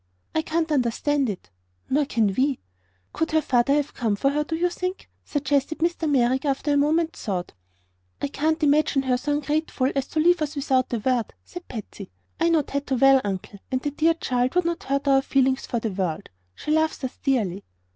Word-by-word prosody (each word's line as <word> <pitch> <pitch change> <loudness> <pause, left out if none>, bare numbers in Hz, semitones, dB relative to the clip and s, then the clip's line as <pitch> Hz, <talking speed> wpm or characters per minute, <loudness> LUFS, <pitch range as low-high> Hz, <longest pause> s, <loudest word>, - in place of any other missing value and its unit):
"I 315 - +2
can't 320 0 -1
understand 275 +1 +1
it." 180 - -7 0.4
"Nor 290 +2 +2
can 220 -7 +1
we." 270 0 +1 0.6
"Could 320 - -1
her 315 - +4
father 255 +2 +3
have 295 -1 -1
come 225 -5 0
for 275 +7 +1
her, 300 +1 0
do 320 +2 -3
you 345 +2 +2
think?" 365 +1 -4 0.2
suggested 285 +1 0
Mr. 335 -1 0
Merrick, 260 -1 +2
after 290 +1 0
a - - +3
moment's 315 +3 +1
thought. 185 -5 -3 0.7
"I - - -1
can't 315 +3 -1
imagine 290 -1 +3
her 255 -1 +2
so 290 +4 -1
ungrateful 295 -2 0
as 275 -1 -1
to 315 - -2
leave 345 +1 +4
us 300 0 -2
without 265 -3 +1
a 240 - 0
word," 240 +1 -1
said 355 -1 -10
Patsy. 210 -4 -8 0.3
"I 335 - +3
know 325 -3 +3
Tato 280 -1 -2
well, 270 +1 +6
Uncle, 200 0 -5
and 260 - +1
the 290 - -1
dear 325 +3 +2
child 250 -2 -1
would 360 -1 +3
not 340 0 -2
hurt 275 +1 -1
our 270 -1 +5
feelings 265 -1 +1
for 235 - -1
the 225 -1 -3
world. 185 -4 -3 0.3
She 300 - -4
loves 315 -2 +1
us 260 - -5
dearly." 205 -8 0
280 Hz, 200 wpm, -24 LUFS, 250-310 Hz, 0.7 s, well